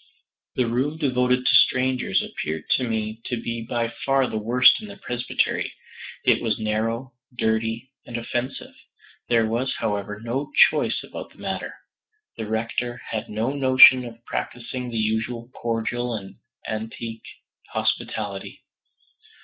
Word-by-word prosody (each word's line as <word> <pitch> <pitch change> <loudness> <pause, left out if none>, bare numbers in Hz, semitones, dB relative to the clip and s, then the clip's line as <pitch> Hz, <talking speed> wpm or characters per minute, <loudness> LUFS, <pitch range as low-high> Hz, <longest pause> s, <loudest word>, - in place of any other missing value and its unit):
The 125 - +2
room 130 +7 0
devoted 125 -3 +2
to - - +5
strangers 130 0 +2
appeared 80 0 -4
to 130 - +3
me 110 0 -2
to 120 - -2
be 115 0 -3
by 115 0 -2
far 135 -1 +3
the 115 - -4
worst 125 - +5
in 215 - -8
the 200 0 -10
presbytery; 125 -8 -1 0.5
it - - +4
was 110 -3 0
narrow, 115 +4 -1 0.2
dirty 115 +3 0
and 120 - -5
offensive. 120 +2 -4 0.6
There 115 -2 +4
was, 120 +4 -1
however, 105 0 -2
no 125 +6 -3 0.2
choice - - -1
about - - -8
the - - -23
matter. - - -4 0.6
The 110 - -5
Rector 115 +2 -2
had 110 -1 -3
no 110 +4 -1
notion 130 -2 +8
of 115 -1 -10
practicing 125 +1 -4
the 115 - -4
usual 115 +2 -1
cordial 120 +1 -2
and 95 -3 -8 0.3
antique 110 +1 -5 0.4
hospitality. 100 -3 -3
115 Hz, 135 wpm, -24 LUFS, 110-125 Hz, 0.6 s, notion